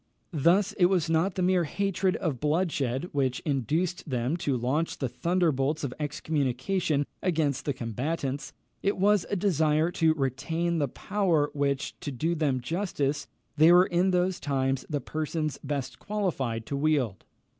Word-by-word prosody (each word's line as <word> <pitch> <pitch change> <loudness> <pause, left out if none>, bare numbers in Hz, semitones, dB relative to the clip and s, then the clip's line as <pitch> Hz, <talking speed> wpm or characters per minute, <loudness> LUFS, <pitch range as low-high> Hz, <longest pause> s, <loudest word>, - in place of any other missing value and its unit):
Thus 180 +7 +3
it 175 - +6
was 175 -4 +1
not 170 +4 +2
the 185 - 0
mere 180 -1 +3
hatred 195 +3 0
of 155 -9 -2
bloodshed 150 -4 0
which 130 -3 0
induced 155 - -1
them 125 +3 0
to 140 -6 0
launch 135 +7 -1
the 135 - -1
thunderbolts 155 -1 0
of 135 -3 -2
excommunication 145 +1 0 0.2
against 155 -7 0
the 145 - 0
combatants: 135 +4 -3 0.3
it 200 - 0
was 205 0 +3
a - - 0
desire 160 -4 +2
to 160 -2 +2
retain 160 +5 -1
the 145 - +1
power, 170 -1 0
which, 140 -2 -1
to 145 - -5
do 160 +7 -1
them 145 -6 0
justice, 145 -2 -2 0.3
they 160 +3 +7
were 180 +1 +7
in 180 +1 +2
those 180 0 +1
times 135 -2 -1
the 145 -3 -1
persons 155 +2 -3
best 135 -3 -4
qualified 135 - -2
to 140 - -3
wield. 140 - 0
155 Hz, 155 wpm, -28 LUFS, 135-175 Hz, 0.3 s, they